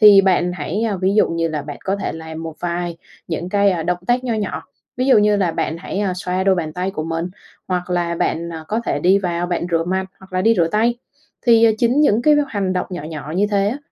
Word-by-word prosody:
Thì 205 -2 +9
bạn 180 -2 +2
hãy, 180 +5 -3
ơ, 215 -4 -1
ví 190 +2 +1
dụ 215 - +4
như 165 0 -1
là 155 -2 -3
bạn 145 -1 -7
có 195 +1 0
thể 200 - -3
làm 160 0 -7
một 165 -1 -6
vài 175 -1 -2 0.3
những 170 +1 -3
cái 195 -4 +2
động 180 0 0
tác 250 +1 +1
nho 235 - 0
nhỏ, 210 -3 -3 0.3
ví 255 +1 0
dụ 260 - +6
như 210 0 +4
là 190 -4 +1
bạn 160 - -2
hãy, 185 - -5
ơ, 195 -3 0
xoa 185 0 -2
đôi 195 -1 +4
bàn 160 -4 -3
tay 180 +3 -2
của 155 -5 -4
mình 165 +2 -3 0.4
hoặc 180 0 -2
là 175 -1 0
bạn, 170 0 -1
ờ, 160 -1 -7
có 220 +2 0
thể - - 0
đi 190 +3 +4
vào 175 -2 -2
bạn 175 -1 -1
rửa 165 -1 +1
mặt 190 +2 -1 0.2
hoặc 190 -1 -16
là 185 - 0
đi 225 +3 +4
rửa 165 -2 +3
tay. 225 +5 +2 0.5
Thì, 230 -1 +6
à, 225 - +6
chính 245 +5 +3
những 240 -6 +3
cái 300 +2 +5
h - - +3
hành 200 -6 -1
động 180 - -1
nhỏ 175 -5 -5
nhỏ 155 -1 -6
như 200 +2 +3
thế 200 0 +2
á, 255 - -3
185 Hz, 265 wpm, -20 LUFS, 170-205 Hz, 0.5 s, Thì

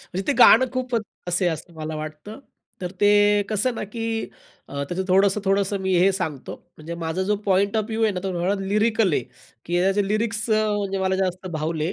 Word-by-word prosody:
म्हणजे 190 - -5
ते - - +3
गाणं 250 +1 +8
खूप 255 -1 -3 0.3
असे 175 +1 +1
असं 165 +1 -5
मला 155 0 -5
वाटतं, 155 - -8 0.4
तर 180 -1 -4
ते 205 0 +4
कसं 220 +4 0
ना, 225 - -4
की 225 +3 -6 0.6
अ, 140 0 -4
त्याचं 185 +2 -2
थोडंसं-थोडंसं 195 +1 +2
मी 190 -1 0
हे 185 +3 +5
सांगतो. 160 -8 -4 0.2
म्हणजे 160 +2 -7
माझा 165 +3 -2
जो 205 +2 0
पॉइंट 200 +2 +2
ऑफ 215 - +1
व्ह्यू 225 0 -2
आहे 220 - +3
ना, 180 - -4
तो 185 0 -1
लिरिकल 210 0 +1
आहे, 135 - +1 0.4
की 175 +1 0
त्याचे 195 +2 +2
लिरिक्स 215 +1 -1
अ, 215 0 +3
म्हणजे 195 -1 -2
मला 190 0 0
जास्त 185 -1 -2
भावले 155 +2 -2
195 Hz, 190 wpm, -23 LUFS, 175-210 Hz, 0.6 s, गाणं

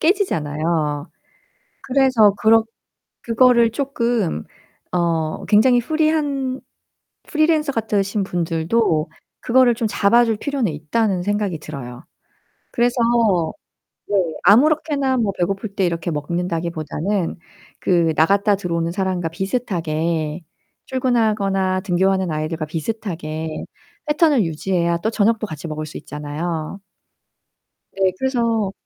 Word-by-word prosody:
깨지잖아요. 155 - 0 0.7
그래서 255 -6 +4
그렇 225 +1 +5 0.6
그거를 235 -1 +4
쪼끔 235 - -1 0.5
어 165 -3 -1
굉장히 245 +4 +5
프리한 290 -3 0 0.7
프리랜서 310 -2 +1
같으신 205 -3 -1
분들도 165 0 0 0.3
그거를 245 -1 +4
좀 225 -2 -1
잡아 225 +4 +4
줄 225 -1 0
필요는 265 - -1
있다는 180 +6 -1
생각이 205 -3 -1
들어요. 135 -3 -8 0.7
그래서 240 +1 +1 1.1
네 205 - -1 0.3
아무렇게나 275 - +3
뭐 215 -4 +1
배고플 195 +3 -2
때 195 -3 +1
이렇게 170 0 -2
먹는다기 170 +2 -2
보다는 165 +5 -2 0.4
그 170 -3 +2
나갔다 200 +6 +3
들어오는 170 -3 -2
사람과 185 -3 -1
비슷하게 165 -5 -2 0.5
출근하거나 210 -7 +1
등교하는 190 -1 +1
아이들과 155 +1 -3
비슷하게 160 -2 -4 0.4
패턴을 295 -5 +3
유지해야 170 +1 0
또 210 +6 -1
저녁도 220 0 +1
같이 155 -1 -7
먹을 155 0 -5
수 - - -8
있잖아요. 155 +4 -5 1.2
네 190 -1 +2
그래서 230 -6 0
195 Hz, 270 characters per minute, -20 LUFS, 165-235 Hz, 1.2 s, 그렇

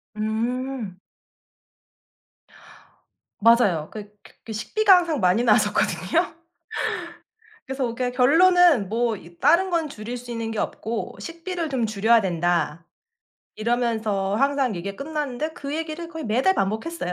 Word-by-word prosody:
음. 225 0 -3 2.4
맞아요. 205 -9 +4
그 210 -1 -9 0.3
그 220 - -6
식비가 385 - +4
항상 335 -5 0
많이 185 +4 +3
나왔었거든요. 215 - +1 1.3
그래서 260 -3 -2
그러니까 250 +1 -1
결론은 325 - +5
'뭐 230 0 0
이 170 -1 -15
다른 365 +4 +4
건 330 -3 0
줄일 235 0 -6
수 245 0 -9
있는 230 -1 -3
게 225 - -4
없고 225 +2 -4
식비를 335 0 -5
좀 245 -4 0
줄여야 220 +2 +3
된다.' 170 -3 -1 0.7
이러면서 220 -4 0
항상 275 -3 +1
얘기가 195 +3 -5
끝났는데 300 -1 -3
그 285 0 -6
얘기를 325 +1 -5
거의 320 -2 -7
매달 255 - +2
반복했어요. 220 - -2
235 Hz, 270 characters per minute, -24 LUFS, 210-305 Hz, 2.4 s, 결론은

